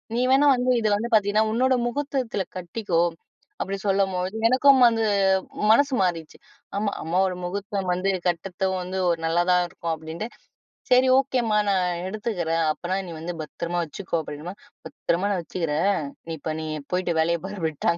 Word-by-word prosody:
நீ 240 - +1
வேணா 280 +2 +5
வந்து 250 +1 +1
இது 220 - 0
வந்து 225 +3 -2
பாத்தீங்கன்னா, 210 0 +3
உன்னோட 260 +3 +3
முஹூர்த்தத்தில 255 -5 -2
கட்டிக்கோ" 180 0 -2 0.6
அப்படி 195 +1 -2
சொல்லம்போது 190 -1 0
எனக்கும் 265 +2 +5
வந்து, 225 -1 +1 0.7
மனசு 280 +4 +4
மாறிடுச்சு. 170 -4 -2 0.4
ஆமா, 205 0 0
அம்மாவோட 180 +3 +1
முஹூர்த்தம் 195 +1 -3
வந்து, 185 +2 0 0.2
கட்றத்தும் 185 +2 -1
வந்து 185 +1 -4
ஒரு 170 -1 0
நல்லா 165 +2 +2
தான் 180 0 +4
இருக்கும் 170 -1 -4
அப்படின்ட்டு, 160 +6 -6 0.6
"சரி 255 +1 +6
ஓகேம்மா. 245 -5 +1
நான் 185 -2 +2 0.2
எடுத்துக்கிறேன். 180 -6 -1
அப்பனா, 185 +4 -3
நீ - - -6
வந்து, 170 +2 -5
பத்திரமா 170 +3 -4
வச்சுக்கோ" 170 +2 -4
அப்படினுமா 155 +6 -7 0.3
"பத்திரமா 185 +4 -1
நான் 185 - -1
வச்சுக்கிறேன். 165 +3 0 0.3
நீ - - -2
இப்போ 155 - -3
நீ 155 - -5 0.3
போய்ட்டு 180 -2 0
வேலைய 170 +1 +1
பார்" 195 -2 -7
விட்டாக. 160 +2 -1
190 Hz, 155 wpm, -24 LUFS, 170-215 Hz, 0.7 s, சரி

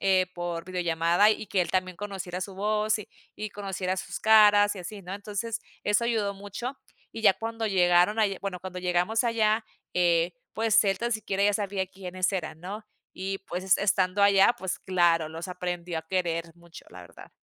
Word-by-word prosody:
eh, 190 -1 +3
por 175 -1 -4
videollamada 175 +2 +2
y 215 - -2
que 185 -2 +1
él - - -5
también 185 -1 -1
conociera 190 -3 -5
su 195 0 -7
voz 215 +2 0
y 210 - -9 0.3
y 215 - -5
conociera 190 -2 -3
sus - - -5
caras 210 -1 +6
y - - -7
así, 200 +4 -8
¿no? 185 +2 -6
Entonces, 210 +2 -4 0.2
eso 210 +3 +2
ayudó 215 -4 0
mucho 205 +7 -6 0.3
y 225 - -7
ya 205 - +7
cuando 225 +2 -4
llegaron 180 +2 +3
allá, 200 -3 +2
bueno, 185 -3 -4
cuando 185 -1 -7
llegamos 180 +6 +1
allá, 220 -1 +2 0.3
eh, 175 -1 +2 0.2
pues 220 -1 +3
él 195 -1 +1
tan 235 0 -1
siquiera 200 -2 -1
ya 205 0 +3
sabía 200 -2 -1
quiénes 185 0 -3
eran, 160 -4 -4
¿no?, 205 +4 -7 0.3
y 195 +1 -3
pues 185 +2 +1
estando 195 -1 +1
allá, 200 +3 +6
pues 190 0 -3
claro, 170 -4 +2
los 165 +3 -7
aprendió 175 -2 -4
a - - -6
querer 170 -2 -1
mucho, 170 -1 -14
la - - -11
verdad. - - -14
190 Hz, 185 wpm, -27 LUFS, 180-210 Hz, 0.3 s, ya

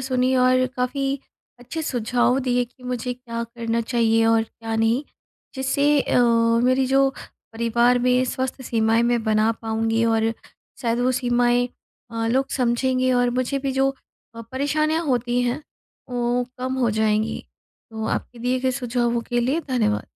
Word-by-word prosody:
सुनी 255 0 +1
और 255 0 +4
काफ़ी 255 +2 -1 0.6
अच्छे 285 +7 -6
सुझाव 245 -1 +1
दिए 245 0 +2
कि 250 +1 -23
मुझे 250 0 -3
क्या 235 -2 -6
करना 230 0 -3
चाहिए 225 -1 +2
और 225 0 +4
क्या 225 0 -7
नहीं। 225 +5 +2 0.5
जिससे 280 +2 +2
अ, 250 - +1 0.5
मेरी 255 +1 +3
जो 270 +1 +4 0.4
परिवार 235 +2 +2
में 250 +1 +2
स्वस्थ 260 +1 -3
सीमाएँ 225 -1 +2
मैं 235 -1 +1
बना 215 0 +2
पाऊँगी 225 +1 0
और 225 0 +2 0.5
शायद 235 0 0
वो 255 +1 +2
सीमाएँ 245 0 +2 0.4
अ, 230 0 -2
लोग 265 +4 +1
समझेंगे 255 +1 +1
और 245 0 +2
मुझे 275 +2 -1
भी 270 -1 -2
जो 270 +1 +2 0.5
अ, 230 - -8
परेशानियाँ 305 +4 0
होती 245 -1 +1
हैं 245 +5 -1 0.5
वो 245 0 0
कम 260 +1 -2
हो 240 -3 +2
जाएँगी। 215 0 +1 0.5
तो 220 0 -5
आपके 245 - -9
दिए 250 +2 0
गए 260 0 +1
सुझावों 240 -1 0
के 240 0 +2
लिए 270 +8 0
धन्यवाद। 220 -5 0
245 Hz, 155 wpm, -23 LUFS, 230-255 Hz, 0.6 s, और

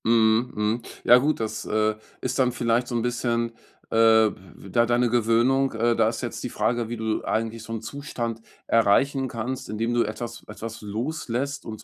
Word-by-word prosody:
Mhm, 115 +1 +3
mhm. 105 +3 0 0.2
Ja, 120 - +8
gut, 150 +4 0
das, 110 0 -3
äh, 110 0 +1 0.3
ist 130 +1 -2
dann 125 -1 +3
vielleicht 120 0 0
so 120 - -4
'n 115 - 0
bisschen, 120 -1 0 0.4
äh, - - -2
w 110 -2 +5 0.2
w 100 - -12
da 115 +5 +3
deine 120 0 +2
Gewöhnung. 120 +3 +3
Äh, 115 +1 +2
da 110 -1 +3
ist 115 - -5
jetzt - - -5
die - - -3
Frage, 120 -1 -1
wie 120 - -4
du 110 -1 -2
eigentlich 115 0 -2
so 115 - -9
'n 110 - -4
Zustand 120 -5 -5 0.2
erreichen 130 +5 +3
kannst, 120 +2 -4
indem 115 +3 -1
du 120 - +3
etwas 120 -1 -6
etwas 110 +2 -7
loslässt 125 +5 -3
und 110 -1 -7
115 Hz, 195 wpm, -25 LUFS, 110-120 Hz, 0.4 s, Ja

